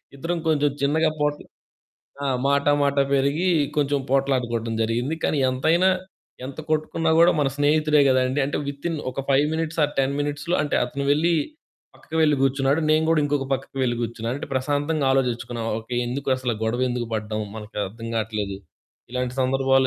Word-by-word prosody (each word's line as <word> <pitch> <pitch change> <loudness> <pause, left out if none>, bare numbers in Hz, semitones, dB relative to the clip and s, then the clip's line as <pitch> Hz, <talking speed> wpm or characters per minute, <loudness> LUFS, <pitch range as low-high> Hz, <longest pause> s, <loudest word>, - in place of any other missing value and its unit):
ఇద్దరం 165 +5 -2
కొంచెం 150 -2 +3
చిన్నగా 155 +3 +2
పోటల్ 150 0 -1 0.8
ఆ! - - 0 0.2
మాట 140 0 +2 0.2
మాట 140 0 +1 0.2
పెరిగి 140 +7 +1 0.3
కొంచెం 145 -1 +2
పోట్లాడుకోవటం 125 -4 0
జరిగింది. 120 +7 -1
కానీ 150 - +1
ఎంతైనా, 160 +8 +3 0.6
ఎంత 135 +3 -8
కొట్టుకున్నా 155 +1 0
గూడా 170 +1 +6
మన 140 - +2
స్నేహితుడే 150 +1 +3
గదండీ! 130 +2 +2
అంటే 145 - -2
వితిన్ 150 +3 -3
ఒక 135 - -4
5 140 +2 +4
మినిట్స్ 160 0 -3
ఆర్ 150 - -2
10 135 +1 +2
మినిట్స్‌లో 145 +4 -2
అంటే 150 - 0
అతను 140 +3 -4
వెళ్లి 165 +4 +2 0.6
పక్కకు 160 - -8
వెళ్ళి 150 -2 +4
గూర్చున్నాడు. 135 +3 +2
నేను 155 +1 +3
గూడా 165 -2 +3
ఇంకొక 145 -2 -1
పక్కకి 135 0 -3
వెళ్లి 120 -2 +1
గూర్చున్నాను. 115 +1 -3
అంటే - - -6
ప్రశాంతంగా 145 +3 0
ఆలోజిచ్చుకున్నాం. 120 -3 -1
ఓకే. 115 +2 -7
ఎందుకు 135 +3 -4
అసలు, 125 -2 -2
గొడవెందుకు 120 +1 -1
పడ్డాం? 110 0 -3 0.2
మనకు 110 0 -10
అర్థం 115 +4 -8
గాట్లేదు 105 -3 -2 0.5
ఇలాంటి 125 0 -2
సందర్భాలు 135 0 +3
140 Hz, 155 wpm, -23 LUFS, 125-150 Hz, 0.8 s, గూడా